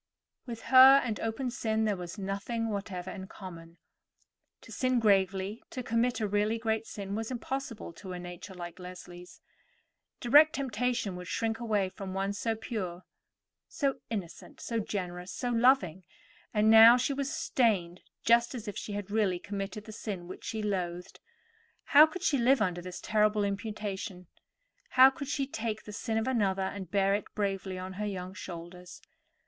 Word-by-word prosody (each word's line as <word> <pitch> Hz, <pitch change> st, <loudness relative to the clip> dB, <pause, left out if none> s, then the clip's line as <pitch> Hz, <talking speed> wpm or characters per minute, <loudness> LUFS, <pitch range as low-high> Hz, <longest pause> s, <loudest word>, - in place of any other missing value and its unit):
With 230 Hz, -2 st, -6 dB
her 265 Hz, +1 st, +10 dB
and 220 Hz, -3 st, -2 dB
open 235 Hz, +3 st, -2 dB
sin 220 Hz, -2 st, 0 dB
there 210 Hz, -2 st, +1 dB
was 180 Hz, +1 st, -7 dB
nothing 205 Hz, +4 st, -3 dB
whatever 195 Hz, -3 st, -4 dB
in 190 Hz, -2 st, -7 dB
common. 170 Hz, -4 st, -11 dB, 0.8 s
To -, -, -14 dB
sin 255 Hz, -1 st, +1 dB
gravely, 195 Hz, 0 st, +1 dB
to 255 Hz, -, -5 dB
commit 235 Hz, +1 st, +1 dB
a 215 Hz, -, 0 dB
really 210 Hz, +2 st, +1 dB
great 225 Hz, -1 st, -1 dB
sin, 200 Hz, -1 st, -6 dB
was 225 Hz, +1 st, -3 dB
impossible 255 Hz, -5 st, -5 dB
to 185 Hz, +2 st, -9 dB
a -, -, -5 dB
nature 175 Hz, +2 st, -9 dB
like 175 Hz, 0 st, -8 dB
Leslie's. 180 Hz, -1 st, -11 dB, 0.8 s
Direct 295 Hz, +6 st, +6 dB
temptation 250 Hz, -6 st, -1 dB
would 180 Hz, 0 st, -8 dB
shrink 225 Hz, +2 st, -1 dB
away 215 Hz, -5 st, 0 dB
from 190 Hz, 0 st, -7 dB
one 195 Hz, +1 st, -1 dB
so 225 Hz, +2 st, -1 dB
pure, 185 Hz, -6 st, -5 dB, 0.6 s
so 275 Hz, -2 st, -1 dB
innocent, 195 Hz, -7 st, -6 dB
so 230 Hz, -1 st, -2 dB
generous, 180 Hz, -3 st, -4 dB
so 245 Hz, -, -3 dB
loving; 230 Hz, -, +3 dB, 0.5 s
and 215 Hz, 0 st, +3 dB
now 225 Hz, +2 st, +10 dB
she 255 Hz, +3 st, 0 dB
was 280 Hz, +1 st, -2 dB
stained 220 Hz, -, 0 dB, 0.2 s
just 235 Hz, +2 st, +4 dB
as 230 Hz, -3 st, -7 dB
if 205 Hz, -, -4 dB
she 210 Hz, -, -5 dB
had 205 Hz, -1 st, -5 dB
really 205 Hz, -4 st, +2 dB
committed 200 Hz, +2 st, -5 dB
the 220 Hz, -, -9 dB
sin 200 Hz, -5 st, -6 dB
which 185 Hz, -, -9 dB
she 220 Hz, -1 st, -3 dB
loathed. 180 Hz, -3 st, -3 dB, 0.6 s
How 300 Hz, +2 st, +7 dB
could 365 Hz, +3 st, -8 dB
she 285 Hz, -6 st, +2 dB
live 255 Hz, +2 st, +4 dB
under 180 Hz, -4 st, 0 dB
this 180 Hz, 0 st, -8 dB
terrible 210 Hz, -1 st, +2 dB
imputation? 200 Hz, -3 st, -4 dB, 0.6 s
How 260 Hz, +1 st, +7 dB
could 280 Hz, +1 st, -7 dB
she 275 Hz, 0 st, -1 dB
take 220 Hz, -4 st, -4 dB
the 210 Hz, -, -9 dB
sin 220 Hz, +2 st, -2 dB
of 225 Hz, -, 0 dB
another 200 Hz, -7 st, +1 dB
and 190 Hz, -2 st, -5 dB
bear 195 Hz, +1 st, +2 dB
it 205 Hz, -, -1 dB
bravely 195 Hz, -2 st, -2 dB
on 185 Hz, +1 st, -6 dB
her 210 Hz, -, -1 dB
young 185 Hz, -2 st, -5 dB
shoulders? 175 Hz, -1 st, -9 dB
210 Hz, 170 wpm, -30 LUFS, 190-235 Hz, 0.8 s, her